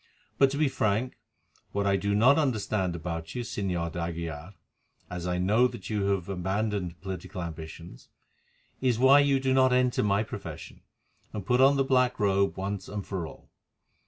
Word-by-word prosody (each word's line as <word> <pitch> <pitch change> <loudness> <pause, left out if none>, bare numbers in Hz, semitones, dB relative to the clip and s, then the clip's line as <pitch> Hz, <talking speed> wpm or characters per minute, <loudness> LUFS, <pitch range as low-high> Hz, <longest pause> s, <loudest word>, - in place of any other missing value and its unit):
"But 135 - +6
to 140 - -4
be 155 0 +3
frank, 115 -1 -1 0.5
what 100 0 0
I 100 -1 +3
do 100 +1 0
not 130 +8 +5
understand 105 - 0
about 80 +1 -5
you, 120 - -2
Señor 90 -7 -2
d'Aguilar, 85 0 -5 0.6
as 90 -1 -4
I 90 0 0
know 105 +7 +3
that 95 -6 -8
you 105 -2 0
have 100 -3 0
abandoned 95 -1 -2
political 95 -1 -6
ambitions, 80 -3 -9 0.7
is 125 -3 +2
why 135 +3 +7
you 140 -1 +3
do 130 0 +1
not 130 -1 +4
enter 125 -1 +2
my 100 0 +2
profession, 110 - -8 0.5
and 105 -3 -5
put 125 +4 +3
on 135 +2 +6
the 135 - +2
black 130 -2 +2
robe 100 -1 +2
once 95 0 -4
and 100 -1 -5
for 90 -5 -4
all. - - -14
100 Hz, 170 wpm, -28 LUFS, 90-125 Hz, 0.7 s, why